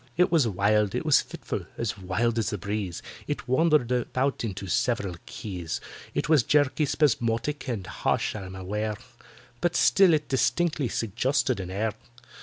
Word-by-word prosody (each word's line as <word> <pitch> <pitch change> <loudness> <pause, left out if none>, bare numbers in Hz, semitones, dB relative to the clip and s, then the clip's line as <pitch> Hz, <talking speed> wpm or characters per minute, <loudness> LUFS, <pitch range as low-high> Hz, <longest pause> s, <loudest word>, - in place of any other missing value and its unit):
It 180 - +4
was 155 -8 +4
wild—it 105 +1 +1
was - - +5
fitful—as 110 -2 -5
wild 110 +5 0
as 110 - 0
the 105 - -3
breeze— 100 -3 -4 0.2
It - - -4
wandered 150 -1 +3
about 130 +2 0
into 100 -3 -4
several 115 -3 0
keys; 90 -6 -5 0.4
It - - 0
was 155 -3 +5
jerky, 145 +4 +2
spasmodic, 145 -1 0
and 105 -6 -3
harsh, - - -1
I'm 95 -3 -7
aware; 105 +3 -3 0.7
But 175 -1 +1
still 185 -3 +5
it 150 -1 -2
distinctly 150 +2 +1
suggested 120 +3 0
an 90 -1 -5
air. 105 +3 -1
115 Hz, 145 wpm, -27 LUFS, 100-145 Hz, 0.7 s, was